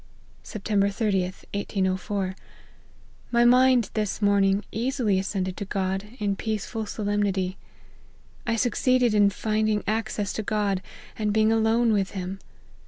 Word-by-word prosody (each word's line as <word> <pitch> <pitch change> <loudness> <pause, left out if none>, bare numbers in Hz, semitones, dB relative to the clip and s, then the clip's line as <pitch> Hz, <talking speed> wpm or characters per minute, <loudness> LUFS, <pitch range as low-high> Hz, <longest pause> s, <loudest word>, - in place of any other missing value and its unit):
" - - -30
Sept. 215 - -8
30/i, 200 -1 +1 0.3
1804. 190 -1 -1 1.0
My 240 0 +4
mind, 250 -2 +5
this 210 -3 -1
morning, 200 -1 +3
easily 235 -4 0
ascended 190 -1 -2
to 205 - -4
God, 195 0 -2
in 205 -4 -1
peaceful 220 +1 -3
solemnity. 200 -3 -1 0.9
1 230 0 +1
succeeded 250 0 +2
in 205 -1 +5
finding 215 +1 0
access 215 -2 -1
to - - -2
God, 205 -3 0 0.4
and 210 -1 +1
being 215 +1 +3
alone 225 +1 +3
with 195 -2 0
him. 185 +1 -4
210 Hz, 125 wpm, -25 LUFS, 195-220 Hz, 1.0 s, mind